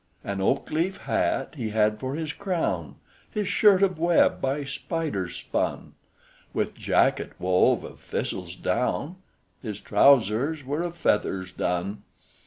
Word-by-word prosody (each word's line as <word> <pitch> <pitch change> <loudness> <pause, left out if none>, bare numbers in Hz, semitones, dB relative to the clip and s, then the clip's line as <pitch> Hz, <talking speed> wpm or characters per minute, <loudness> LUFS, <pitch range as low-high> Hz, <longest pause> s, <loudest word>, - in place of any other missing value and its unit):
"An 100 -1 -3
oak 95 - 0
leaf 170 +5 0
hat - - 0
he 115 -4 -2
had 105 0 +2
for 130 +3 -3
his 155 -2 -3
crown; 185 -4 -2 0.3
His 210 -2 -2
shirt 200 -1 +5
of 185 -4 +1
web 170 0 +3
by 135 +2 0
spiders 140 - -3
spun; - - -3 0.6
With - - 0
jacket - - +1
wove 90 0 +3
of - - -10
thistle's - - -4
down; 170 +6 -1 0.4
His 105 -5 -5
trousers 135 +5 +3
were 145 +5 -1
of 175 0 -4
feathers 95 - 0
done. 90 +3 -2
140 Hz, 135 wpm, -26 LUFS, 105-170 Hz, 0.6 s, shirt